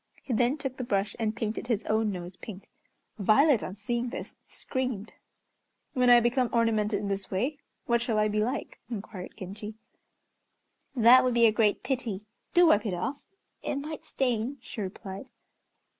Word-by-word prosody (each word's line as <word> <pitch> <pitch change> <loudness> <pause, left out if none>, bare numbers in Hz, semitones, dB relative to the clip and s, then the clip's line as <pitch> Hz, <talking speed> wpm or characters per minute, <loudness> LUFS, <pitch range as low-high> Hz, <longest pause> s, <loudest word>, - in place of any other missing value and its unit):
He 255 - -3
then 245 +5 +2
took 270 -3 -5
the 255 - -3
brush 200 -3 0
and 220 -1 0
painted 220 +1 -3
his 225 -3 0
own 220 0 +1
nose 180 -1 -6
pink. 195 0 -10 0.5
Violet, 245 +6 +5
on 185 - -5
seeing 240 +4 -2
this, - - -6
screamed. 255 -6 -2 0.8
"When 250 -3 +3
I 240 0 +9
become 240 +1 +1
ornamented 220 -3 +2
in 205 - -3
this 195 -1 -1
way 255 +10 -1 0.3
what 235 0 +2
shall 235 -2 0
I 215 0 +3
be 210 0 0
like?" 250 +4 -3
inquired 200 -4 -7
Genji. 210 +3 -7 1.2
"That 240 +1 +7
would 250 -2 +1
be 235 -1 +6
a 220 - +6
great 210 -1 +2
pity. 240 -6 -2 0.3
Do 350 0 +7
wipe 215 -9 +4
it 185 - -1
off, 275 +11 -4 0.3
it - - -2
might 300 +2 -5
stain," 250 +1 -1
she 230 - -7
replied. 195 +3 -7
225 Hz, 170 wpm, -28 LUFS, 205-250 Hz, 1.2 s, I